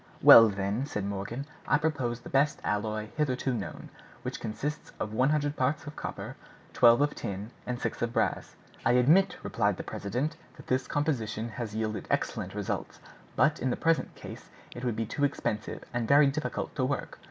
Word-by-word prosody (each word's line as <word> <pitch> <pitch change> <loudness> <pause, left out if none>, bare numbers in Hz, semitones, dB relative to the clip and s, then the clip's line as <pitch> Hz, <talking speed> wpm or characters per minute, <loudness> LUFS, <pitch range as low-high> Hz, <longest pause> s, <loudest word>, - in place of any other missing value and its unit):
"Well, 115 -1 +10
then," 100 +6 -2
said 105 -8 -3
Morgan, 100 +7 -4 0.2
"I 145 - +4
propose 130 -6 -1
the - - -10
best 140 +2 +2
alloy 105 +1 -2
hitherto 130 -3 0
known, 110 -5 -5 0.3
which - - -4
consists 145 +8 -4
of 105 - -3
one 130 +5 +3
hundred 145 -1 +1
parts 140 +4 0
of 145 0 -8
copper, - - -6 0.4
twelve 120 +1 +6
of 145 0 +2
tin, 100 0 -5 0.2
and 125 -1 -2
six - - -3
of 120 0 0
brass." - - -1 0.3
"I - - +3
admit," 165 +10 +4
replied - - 0
the - - -5
president, 130 +11 -3 0.2
"that - - -12
this 130 +1 0
composition 120 -7 -1
has 110 -1 -5
yielded 110 -1 -2
excellent - - -1
results, - - -4 0.4
but 155 0 +3
in 130 - 0
the - - -1
present 165 -1 +1
case - - -10 0.3
it 120 - -7
would 120 -3 0
be 115 +1 -1
too 140 +6 -3
expensive, 110 -6 -2
and 120 -2 -1
very 145 +1 +7
difficult 145 +3 -2
to 130 - +1
work. 135 +2 -2
125 Hz, 185 wpm, -29 LUFS, 110-145 Hz, 0.4 s, Well